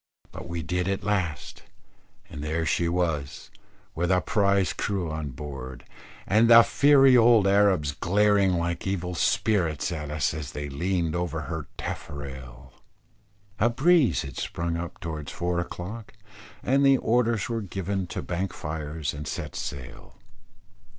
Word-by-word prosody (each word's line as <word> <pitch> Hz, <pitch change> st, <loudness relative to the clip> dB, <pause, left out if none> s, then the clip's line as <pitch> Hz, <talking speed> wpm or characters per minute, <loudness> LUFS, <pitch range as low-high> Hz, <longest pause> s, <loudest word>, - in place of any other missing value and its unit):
But -, -, -9 dB
we 85 Hz, -1 st, -4 dB
did 90 Hz, +4 st, -1 dB
at 95 Hz, 0 st, -2 dB
last, 90 Hz, -10 st, -2 dB, 0.7 s
and 75 Hz, -, -8 dB
there 80 Hz, +2 st, -1 dB
she 85 Hz, +1 st, +1 dB
was, 80 Hz, -6 st, -2 dB, 0.4 s
with 85 Hz, +2 st, -1 dB
a 90 Hz, -, +4 dB
prize 100 Hz, -1 st, +1 dB
crew 95 Hz, -6 st, -2 dB
on 80 Hz, -2 st, -4 dB
board, 65 Hz, -2 st, -8 dB, 0.4 s
and 110 Hz, +3 st, +3 dB
the 115 Hz, 0 st, +10 dB
fiery 135 Hz, -1 st, +5 dB
old 115 Hz, -3 st, +6 dB
Arabs 95 Hz, -7 st, +3 dB
glaring 100 Hz, +4 st, +2 dB
like 85 Hz, +1 st, -2 dB
evil 90 Hz, -2 st, -2 dB
spirits 85 Hz, -4 st, +1 dB
at 75 Hz, -3 st, -5 dB
us 75 Hz, -1 st, 0 dB
as 75 Hz, -5 st, -6 dB
they 75 Hz, 0 st, -5 dB
leaned 85 Hz, +3 st, -1 dB
over 85 Hz, -2 st, -2 dB
her 80 Hz, -1 st, -5 dB
taffrail. 65 Hz, -3 st, -7 dB, 0.9 s
A 115 Hz, -, +4 dB
breeze 145 Hz, +2 st, +3 dB
had 70 Hz, -3 st, -8 dB
sprung 85 Hz, 0 st, -3 dB
up 85 Hz, 0 st, -6 dB
towards 80 Hz, -3 st, -6 dB
four 85 Hz, 0 st, -1 dB
o'clock, 100 Hz, +6 st, -6 dB, 0.5 s
and 135 Hz, +2 st, +2 dB
the 135 Hz, -1 st, +6 dB
orders 115 Hz, -2 st, +1 dB
were 115 Hz, -1 st, -2 dB
given 95 Hz, -1 st, -3 dB
to -, -, -5 dB
bank 90 Hz, +1 st, -3 dB
fires 75 Hz, -1 st, -4 dB
and 75 Hz, 0 st, -7 dB
set -, -, -5 dB
sail. 65 Hz, -4 st, -7 dB
85 Hz, 145 wpm, -26 LUFS, 75-100 Hz, 0.9 s, the